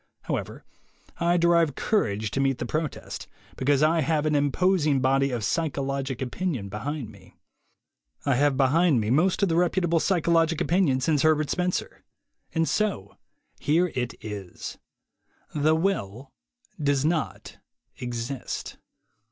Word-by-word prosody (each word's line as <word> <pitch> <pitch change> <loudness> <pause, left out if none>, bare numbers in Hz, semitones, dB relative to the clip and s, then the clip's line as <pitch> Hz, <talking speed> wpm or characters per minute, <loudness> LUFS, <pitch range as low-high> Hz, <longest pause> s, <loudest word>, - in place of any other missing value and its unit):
However, - - -4 0.5
I 175 +1 +3
derive 170 -4 +3
courage 110 - 0
to - - -2
meet 135 -2 +1
the - - -4
protest 155 -1 -4 0.3
because 140 +2 +2
I 160 +1 +3
have 155 +1 +1
an 155 - +1
imposing 150 +1 +2
body 135 +1 +2
of 120 -4 -3
psy 160 +11 0
chologic 135 -2 -3
opinion 130 - -3
behind 125 +4 -4
me. 95 -3 -18 0.9
I 140 - +3
have 140 +1 +2
behind 145 +1 +4
me 110 +1 -1
most 175 +8 +2
of 195 - +3
the 165 - +1
reputable 175 -1 +2
psychologic 165 -3 +2
opinion 165 -7 +2
since 150 0 +2
Herbert 155 -2 +2
Spencer. 180 0 -2 0.5
And 165 0 +1
so 200 - -1 0.4
here 165 +4 +2
it 125 -2 -2
is: 100 -4 -7 0.7
The 155 +1 +3
will 140 - -2 0.5
does 145 -1 +1
not 160 -2 -2 0.4
exist. 120 +2 -5
145 Hz, 135 wpm, -26 LUFS, 130-165 Hz, 0.9 s, behind